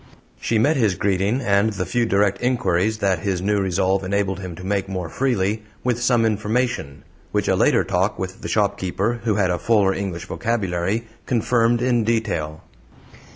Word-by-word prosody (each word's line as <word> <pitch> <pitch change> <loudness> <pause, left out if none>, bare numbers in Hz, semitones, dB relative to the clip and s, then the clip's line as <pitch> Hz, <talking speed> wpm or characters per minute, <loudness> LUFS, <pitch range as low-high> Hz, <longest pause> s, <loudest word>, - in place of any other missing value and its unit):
She 115 - 0
met 145 +8 +3
his 110 -7 +2
greeting, 100 +7 0
and 105 -1 +2
the 90 -2 -3
few 115 +6 0
direct 100 -1 +1
inquiries 110 -4 +1
that 95 -4 +1
his 95 -1 -1
new 100 +2 +1
resolve 95 0 +1
enabled 95 0 -1
him 90 -3 -6
to 90 - -10
make 100 0 -1
more 90 -4 -4
freely, 110 -3 0 0.2
with 120 -1 0
some 120 -1 +3
information 110 - -1 0.3
which - - 0
a - - +3
later - - +3
talk 95 +3 0
with 95 0 -5
the - - -5
shopkeeper, 100 +2 0
who 110 -3 +2
had 95 -3 +2
a 90 - -1
fuller 100 -1 +3
English 90 -5 -4
vocabulary, 100 0 -1 0.2
confirmed 120 0 +2
in 120 -2 +2
detail. 100 -9 -1
100 Hz, 170 wpm, -22 LUFS, 95-115 Hz, 0.3 s, met